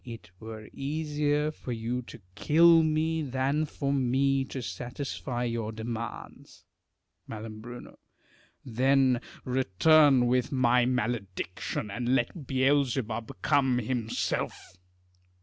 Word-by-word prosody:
It 115 -7 -10
were 110 -1 -9
easier 150 +1 -1
for 130 - -8
you 120 +2 -2
to - - -10
kill 165 - +5
me, 160 +1 +1
than 140 +2 0
for 140 -1 -2
me 135 +1 +2
to 130 - -6
satisfy 125 +3 -4
your 115 -2 -2
demands. 115 +1 -7 0.6
Mai. 110 0 -6 1.2
Then 130 +1 +2 0.2
return 130 - +4
with 125 +3 +1
my 125 -2 +3
malediction, 105 -5 -3
and 120 +4 0
let 130 +4 -2
Beelzebub 130 -4 +1
come 130 -3 +3
himself. 115 -6 -2
125 Hz, 100 wpm, -28 LUFS, 115-140 Hz, 1.2 s, kill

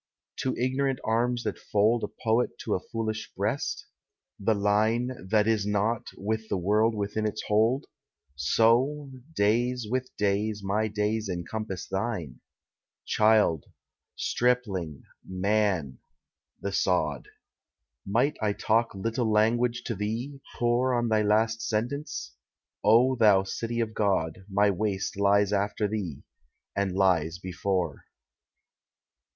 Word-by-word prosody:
To 130 - -1
ignorant 130 +1 0
arms 120 +2 0
that - - -3
fold 110 +3 +2
A - - 0
poet 115 +2 0
to 105 - -2
a - - +1
foolish 110 +2 -4
breast? - - -2 0.5
The 110 +2 +2
Line, 110 +5 +1 0.2
That 105 0 +3
is 110 -2 +1
not, 105 +2 0
with 110 +2 -3
the - - 0
world 105 +5 +2
within 105 +1 -1
its 105 - -4
hold? 115 +7 +2 0.5
So, 120 - +2 0.2
days 120 +3 +1
with 130 +3 -2
days, 105 +1 0
my 105 +3 0
days 105 0 -1
encompass 95 +2 -4
thine. 95 - -3 0.7
Child, 105 -8 +3 0.5
Stripling, 100 - -1 0.2
Man—the 95 -2 -3
sod. 80 -8 0 0.8
Might 125 +9 +1
I 105 -1 +1
talk 115 +1 +1
little 115 +3 -1
language 115 +3 +2
to 115 - -3
thee, 115 +7 -4
pore 125 +2 +2
On 120 -1 0
thy 110 -1 +3
last 110 +2 +2
silence? 120 - -3 0.5
O 120 +5 +5
thou 105 -5 +5
city 115 +4 -3
of 110 -1 -1
God, 95 -4 0
My 100 +1 +3
waste 100 0 -2
lies 100 0 +3
after 105 +1 0
thee, 100 -9 -4 0.5
and 100 -1 0
lies 90 -4 +2
before. 90 -3 -2
110 Hz, 120 wpm, -27 LUFS, 100-115 Hz, 0.8 s, O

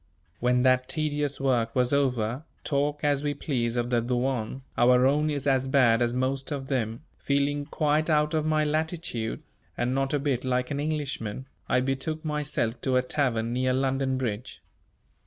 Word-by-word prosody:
When 125 +1 +2
that 130 0 +3
tedious 150 -2 -1
work 120 -4 +1
was 125 +1 +2
over 125 -2 +1 0.2
talk 145 +1 0
as 145 -1 +2
we 145 0 -1
please 120 -5 -1
of 120 0 -1
the 120 -1 +3
douane, 125 +1 -2
our 125 +1 +5
own 150 +3 +3
is 145 -2 -2
as 135 -1 +2
bad 125 -4 +4
as 120 -1 +2
most 130 +3 -2
of 135 -2 -4
them 115 -1 -2 0.2
feeling 145 +1 0
quite 155 +1 +1
out 150 0 +2
of 155 -1 +1
my 155 0 +2
latitude, 155 -7 -2 0.3
and 125 +1 0
not 135 0 0
a 145 - +2
bit 140 -3 -1
like 125 +1 0
an 140 - -1
Englishman, 140 -6 -3 0.2
I 125 - +3
betook 135 +5 -2
myself 150 -6 -1
to 130 -1 0
a 125 - +3
tavern 120 -4 0
near 130 +1 +1
London 135 0 0
Bridge. 120 -2 -4
135 Hz, 175 wpm, -27 LUFS, 125-145 Hz, 0.3 s, our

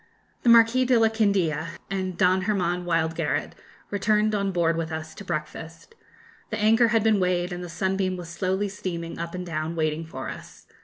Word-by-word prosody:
] - - -39
The 240 - +2
Marquis 230 +2 +6
de 250 -1 +4
la 225 -1 +4
Candia 175 -7 0
and 185 -2 -2
Don 185 +1 +3
Hermann 180 -3 0
Wildgaret 165 -1 0 0.4
returned 210 +1 +2
on 200 -1 0
board 170 -2 +1
with 165 0 -3
us 160 0 -5
to - - -10
breakfast. 165 - -6 0.6
The 220 - -3
anchor 225 +2 +4
had 225 -1 +2
been 220 -2 +3
weighed, 180 -1 0
and 175 0 -5
the 175 - -7
'Sunbeam' 190 +2 -1
was 175 -1 -7
slowly 190 +3 -1
steaming 170 -4 -5
up 170 +1 -5
and 180 0 -5
down, 165 -1 -3
waiting 155 0 -1
for 130 -4 -6
us. - - -11
180 Hz, 190 wpm, -25 LUFS, 165-205 Hz, 0.6 s, Marquis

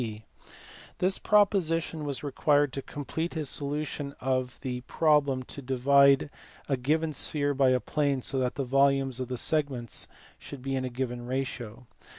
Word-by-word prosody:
This 185 +1 +2
proposition 165 -7 +2
was 140 -1 -3
required 145 0 +2
to 135 - -3
complete 160 +5 -4
his 155 -4 -2
solution 145 0 -2
of 130 -1 -1
the 125 -1 -4
problem 145 -5 +2
to 140 - -7
divide 140 +2 +4 0.4
a 140 - +1
given 155 +5 0
sphere 145 +1 -1
by 135 -1 +3
a 130 0 +3
plane 140 -1 -1
so 135 - 0
that 125 0 -1
the 135 - -2
volumes 135 0 +2
of 130 - -3
the 125 0 -4
segments 135 -6 -1 0.3
should 135 -3 -10
be 135 0 -2
in 130 -1 -1
a - - -3
given 120 -1 -4
ratio. 125 -3 -4
140 Hz, 160 wpm, -28 LUFS, 130-150 Hz, 0.4 s, divide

